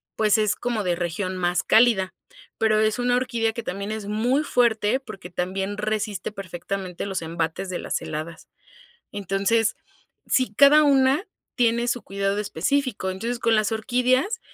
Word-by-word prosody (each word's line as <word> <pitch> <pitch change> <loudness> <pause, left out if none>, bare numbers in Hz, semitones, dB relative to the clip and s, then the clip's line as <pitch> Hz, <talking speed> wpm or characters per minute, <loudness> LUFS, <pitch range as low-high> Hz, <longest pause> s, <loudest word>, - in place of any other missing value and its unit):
pues 215 -1 +3
es 210 -1 +1
como 235 -4 -2
de 175 -1 0
región 185 +2 -3
más 175 0 0
cálida, 220 -5 +4 0.4
pero 215 -1 +2
es 215 +2 +1
una 245 0 +2
orquídea 235 -3 0
que 235 - -5
también 200 +3 -4
es 220 -1 -5
muy 245 +7 +1
fuerte 235 -2 +2
porque 215 -8 -10
también 190 +3 -3
resiste 210 -2 -2
perfectamente 185 -1 -5
los 190 -3 -3
embates 165 +3 -3
de 180 - -3
las - - -3
heladas. 155 +2 -6 0.6
Entonces, 205 +3 0 0.5
sí, 255 -5 +1
cada 290 +4 +7
una 275 +4 +3 0.3
tiene 235 -1 +2
su 245 - -1
cuidado 195 +1 -2
específico, 210 - -1
entonces 230 +6 -3
con 230 - +2
las 215 -1 +1
orquídeas, 250 - +1
215 Hz, 155 wpm, -24 LUFS, 190-240 Hz, 0.6 s, cada